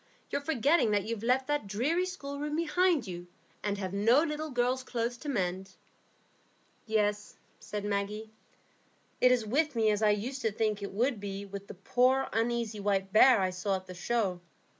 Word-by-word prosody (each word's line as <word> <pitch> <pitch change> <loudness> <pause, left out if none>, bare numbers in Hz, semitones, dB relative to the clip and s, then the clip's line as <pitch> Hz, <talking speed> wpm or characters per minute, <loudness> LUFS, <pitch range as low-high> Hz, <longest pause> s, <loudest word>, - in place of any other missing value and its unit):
"You're - - -1
forgetting 285 -2 +2
that 205 -1 +2
you've 225 0 -4
left 255 +3 +2
that 295 -7 -1
dreary 290 - 0
schoolroom 295 -4 -5
behind 335 -3 +2
you, 175 -2 -7 0.3
and 205 -1 -2
have 190 -1 -4
no 230 +9 +4
little 310 -1 -3
girls' 250 0 0
clothes 240 -1 -2
to 295 - -6
mend." 190 -5 -2 1.1
"Yes," 210 -1 0 0.2
said 205 -1 -5
Maggie. 205 +2 -3 0.9
"It 250 - +6
is 245 -3 +2
with 290 +5 +1
me 220 -2 +3
as 210 0 -1
I 215 - +4
used 240 +6 -1
to 225 - 0
think 215 -1 -1
it 200 - -5
would 235 +3 0
be 200 0 -5
with 200 0 -8
the - - -9
poor 255 +7 +2
uneasy 225 -1 -1
white 195 -1 -1
bear 235 +1 +7
I 185 -1 +1
saw 190 +2 -1
at 185 0 -6
the 185 - -9
show. 185 -1 -1
220 Hz, 180 wpm, -30 LUFS, 200-265 Hz, 1.1 s, bear